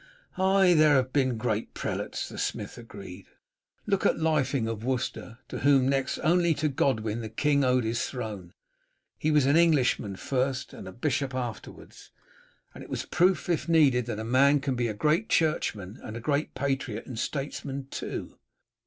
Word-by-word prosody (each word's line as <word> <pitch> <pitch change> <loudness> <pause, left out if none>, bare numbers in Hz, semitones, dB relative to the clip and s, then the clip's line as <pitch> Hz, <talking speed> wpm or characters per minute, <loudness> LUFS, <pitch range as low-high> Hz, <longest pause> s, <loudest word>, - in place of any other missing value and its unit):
"Ay, 190 -1 +4
there 155 -2 +5
have 130 -1 +1
been 130 -4 +1
great 110 -1 -2
prelates," - - -3
the - - -8
smith - - -3
agreed. 100 -5 -11 0.6
"Look 200 -2 0
at - - +3
Lyfing 140 -7 +1
of 115 -1 -4
Worcester, 125 -2 -3
to - - -5
whom 135 -2 +4
next 135 -1 0
only 170 0 +3
to 155 +1 0
Godwin 115 -5 0
the 110 - -5
king 140 +5 +1
owed 125 -1 +3
his 115 +1 -1
throne. 105 -8 -6 0.7
He 155 - 0
was 150 -3 +4
an 140 +2 +4
Englishman 140 - +2
first 130 +5 -2
and - - -9
a - - -7
bishop 130 +3 -2
afterwards, 120 -4 -7 0.6
and - - -10
was - - -3
a - - -17
proof, 185 +2 +2
if 170 -1 -1
needed, 135 -7 +4
that 115 - -3
a 110 - -4
man 135 +5 +4
can 135 -1 -2
be 120 -1 0
a 110 - -4
great 155 - +1
churchman 110 - 0
and 110 +1 -7
a - - -5
great 145 +5 -1
patriot 135 -4 -2
and 120 -4 -7
statesman 140 0 -4
too. - - -6
130 Hz, 175 wpm, -27 LUFS, 115-150 Hz, 0.7 s, there